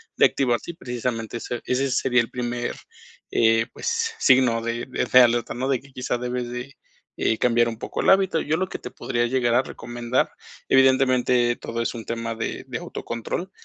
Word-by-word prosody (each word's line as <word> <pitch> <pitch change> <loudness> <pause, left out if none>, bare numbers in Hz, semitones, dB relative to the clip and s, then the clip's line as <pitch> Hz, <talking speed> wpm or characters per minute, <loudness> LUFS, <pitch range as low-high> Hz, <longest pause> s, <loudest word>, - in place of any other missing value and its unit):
de - - +6
activarse, 125 +3 0
y - - -15
precisamente 120 -5 -4
ese 120 +1 -4
ese 130 +1 0
sería 125 -1 +3
el 115 - -5
primer, 120 -1 -3 0.6
eh, 115 0 +3
pues, 460 -1 -1
signo 125 -4 +4
de 115 +1 -3
de 130 0 +3
alerta, 120 -1 +3
¿no? 130 +2 -2
De 135 -3 0
que, 140 0 -18
quizá, 125 -1 -2
debes 125 0 -3
de, 125 +3 -6 0.4
eh, 110 - +1
cambiar 120 -1 +3
un 115 - -6
poco - - -4
el - - +2
hábito. 190 -4 +4
Yo 155 +2 0
lo 190 +2 -1
que - - -6
te - - -7
podría 120 0 -1
llegar 120 -1 +1
a 125 - +5
recomendar, 120 -1 -2 0.4
evidentemente, 130 -2 +4
todo 115 0 -5
es 115 - -1
un 115 -2 -7
tema 115 0 -3
de 115 - -4
de - - -4
autocontrol, 115 - -5
125 Hz, 190 wpm, -24 LUFS, 120-130 Hz, 0.6 s, de